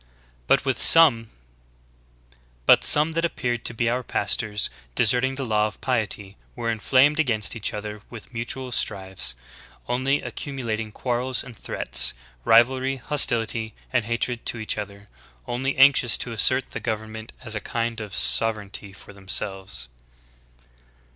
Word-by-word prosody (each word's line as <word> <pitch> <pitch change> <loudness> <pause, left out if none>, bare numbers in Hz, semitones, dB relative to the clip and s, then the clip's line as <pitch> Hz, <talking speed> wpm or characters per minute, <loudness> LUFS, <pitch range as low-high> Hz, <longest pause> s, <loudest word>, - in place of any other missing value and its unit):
=•< 140 -9 +6 1.4
^^^ - - +5
some 150 +2 +6
that 165 +1 -2
appeared 120 -8 -2
to - - -2
be 120 +1 -1
our 125 +2 0
pastors, 105 -1 0 0.3
deserting 125 +4 +3
the 135 -1 -4
law 105 -2 +1
of 105 - -11
piety, 105 -5 -2 0.2
were 115 -1 -2
inflamed 130 +7 +2
against 115 -9 0
each 110 - -3
other 105 0 -7
with 115 +1 -12
mutual 125 +2 -5
strifes, 95 - -1 0.5
only 130 +4 0
accumulating 115 -6 -5
quarrels 125 +3 -1
and 125 - -12
threats, - - 0 0.3
rivalry, 130 - +3
hostility, 115 -5 -1 0.2
and 125 -3 +1
hatred 115 +1 -2
to - - -2
each 110 -1 -2
other, 100 -1 -8 0.4
only 130 +3 -2
anxious 135 -4 +5
to 120 - -4
assert 130 +4 +2
the - - -5
govern 110 -1 -4
ment 110 +1 -9
as 110 - -5
a 105 - -3
kind 115 +1 -3
of 105 -2 -7
sovereignity 105 -3 +1
for 100 - -15
themselves." 95 - -2
115 Hz, 135 wpm, -23 LUFS, 105-130 Hz, 1.4 s, =•<